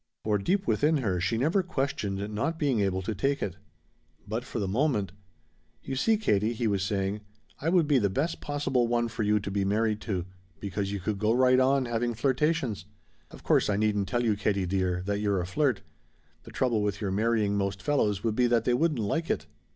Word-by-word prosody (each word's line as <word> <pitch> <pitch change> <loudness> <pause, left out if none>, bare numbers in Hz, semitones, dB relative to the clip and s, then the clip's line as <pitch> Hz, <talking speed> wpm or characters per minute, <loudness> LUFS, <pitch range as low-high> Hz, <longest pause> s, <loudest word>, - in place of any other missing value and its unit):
For 105 -1 +1
deep 190 - 0
within 155 -2 +2
her 95 -10 -1
she 90 +6 0
never 160 - +2
questioned 110 - -3
not 140 +10 -1
being 140 -7 +1
able 95 -2 0
to 110 - -2
take 135 +8 0
it. 100 - -4 0.7
But 110 +3 -3
for - - -6
the 100 -3 -1
moment 105 - 0 0.7
"You 135 - -4
see, 220 +11 +2
Katie," 110 - +1
he 115 +1 -2
was 100 -3 +1
saying, 100 +1 -1 0.4
"I 160 - -1
would 175 -2 +4
be 145 -3 +4
the 100 -3 +1
best 145 - -2
possible 140 -4 0
one 120 0 +1
for 115 - -5
you 105 0 +2
to 100 0 -5
be 100 0 0
married 105 +2 0
to, 95 -6 -2 0.3
because 100 0 -3
you 100 - -3
could 100 +2 -3
go 105 +2 +2
right 130 +1 +4
on 135 0 +3
having 120 0 -1
flirtations. 130 - 0 0.4
Of - - -13
course - - +3
I 100 - +1
needn't 105 -2 +1
tell 120 +5 0
you, 110 -3 +2
Katie 100 -2 0
dear, 90 -1 -1
that 100 0 -1
you're 100 -2 +1
a 90 - -2
flirt. 135 +8 0 0.6
The - - -11
trouble 120 -5 +1
with 105 -1 -1
your 100 -3 -2
marrying 105 0 +1
most 100 -1 -1
fellows 105 -4 0
would 110 -2 0
be 125 +1 +3
that 120 -2 +2
they 125 - +3
wouldn't 155 +3 +1
like 160 +11 -1
it." - - -1
110 Hz, 215 wpm, -28 LUFS, 100-130 Hz, 0.7 s, would